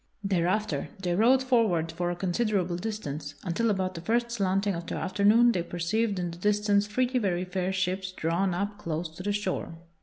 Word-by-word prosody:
Thereafter 195 +3 0
they 180 -2 -1
rode 245 +7 +4
forward 215 -11 +2
for 175 +2 -2
a 175 - -2
considerable 185 0 0
distance, 155 -8 -5
until 190 +6 0
about 190 -2 0
the 165 - -7
first 235 +5 0
slanting 195 -2 +1
of 170 -1 -5
the - - -3
afternoon 210 +5 +4
they 180 - 0
perceived 185 +5 -1
in 175 -1 -2
the 170 - -10
distance 205 +1 +2
three 250 +4 +1
very 185 -4 0
fair 185 0 -2
ships 185 0 -1
drawn 175 +1 0
up 205 +2 -3
close 165 -3 -3
to 160 +3 -10
the 205 +2 -1
shore. 200 -4 -2
190 Hz, 185 wpm, -28 LUFS, 175-210 Hz, -, rode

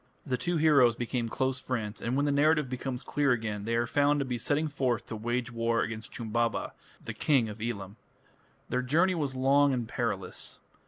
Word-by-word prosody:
The 130 - 0
two 170 +8 -1
heroes 140 -7 +5
became 120 0 -2
close 130 +2 -1
friends, 115 -5 -4
and 120 +2 -1
when 145 - +2
the 145 - +2
narrative 150 +1 +3
becomes 125 0 -4
clear 145 -3 +2
again, 105 -3 -3
they 115 +1 0
are 120 0 +2
found 145 +4 +2
to 140 - 0
be 125 -2 -3
setting 145 +6 0
forth 130 -5 -1
to - - -6
wage 120 +2 -2
war 115 0 +1
against 110 0 -6
Chumbaba, 115 0 -1 0.3
the - - -4
King 135 -7 +2
of 105 +1 -8
Elam. 105 -3 -4 0.7
Their 125 - 0
journey 165 +9 +3
was 145 -6 -2
long 140 +2 +4
and 120 -3 -2
perilous. 105 -6 -3
125 Hz, 195 wpm, -29 LUFS, 115-140 Hz, 0.7 s, heroes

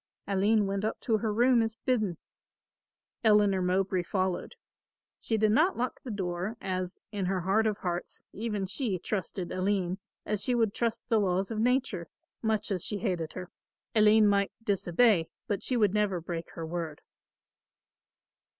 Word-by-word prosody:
Aline 205 +2 +2
went 195 +1 -2
up 220 - -1
to 220 -3 +1
her 220 0 -1
room 240 +2 +4
as 225 -1 -1
bidden. 215 - +1 1.1
Eleanor 210 -3 +4
Mowbray 185 0 +1
followed. 185 - -2 0.6
She 225 - -1
did 215 0 +3
not 315 - +3
lock 245 +1 -2
the 255 - -8
door, 190 +1 -3
as, 185 -1 -3
in 200 -3 -2
her 185 -1 0
heart 205 +5 +2
of 210 -2 0
hearts, 175 -2 -4
even 210 -3 -2
she 200 +1 -1
trusted 185 -1 -3
Aline 185 -1 0 0.3
as 210 -1 -1
she 250 - +2
would 225 -3 +2
trust 235 -1 -2
the 225 - +4
laws 190 +1 0
of 220 - -2
nature, 240 -7 +1 0.3
much 220 -1 0
as 185 -4 -1
she 210 - -2
hated 180 -7 -2
her. 180 -1 -7 0.4
Aline 215 0 +6
might 200 -1 +2
disobey, 195 -2 +3 0.2
but 200 -2 -1
she 255 - 0
would 210 -4 +3
never 205 -4 +1
break 165 0 -5
her 165 - -5
word. 160 -2 -4
200 Hz, 160 wpm, -29 LUFS, 185-220 Hz, 1.1 s, Aline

